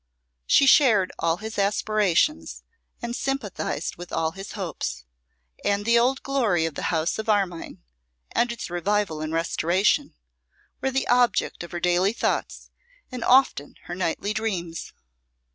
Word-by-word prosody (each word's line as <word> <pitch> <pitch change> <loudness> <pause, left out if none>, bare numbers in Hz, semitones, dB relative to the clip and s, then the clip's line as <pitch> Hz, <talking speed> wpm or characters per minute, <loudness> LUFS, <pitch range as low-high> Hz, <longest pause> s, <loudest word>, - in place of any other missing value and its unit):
She 275 - +5
shared 230 -9 +5
all 165 0 +1
his 220 +1 -6
aspirations 210 - +1 0.4
and 235 0 -3
sympathised 270 -8 -3
with 175 0 -9
all 160 0 0
his 195 +3 -9
hopes; 70 - -4 0.6
and 205 0 0
the 235 +1 +5
old 260 +3 +1
glory 225 -12 +1
of 165 - -3
the - - -3
house 165 +4 0
of 220 - -4
Armine, 195 -5 -1 0.5
and 240 0 +1
its 235 -6 -6
revival 175 -2 0
and 155 0 -3
restoration, 175 - +1 0.7
were 265 - +1
the 265 0 -1
object 245 -7 +2
of 170 - -10
her 175 - -4
daily 180 +4 +2
thoughts, - - -2 0.4
and 250 -2 -5
often 255 - +3
of - - -26
her 175 - -6
nightly 185 +3 -2
dreams. 180 -7 -3
200 Hz, 145 wpm, -25 LUFS, 170-235 Hz, 0.7 s, She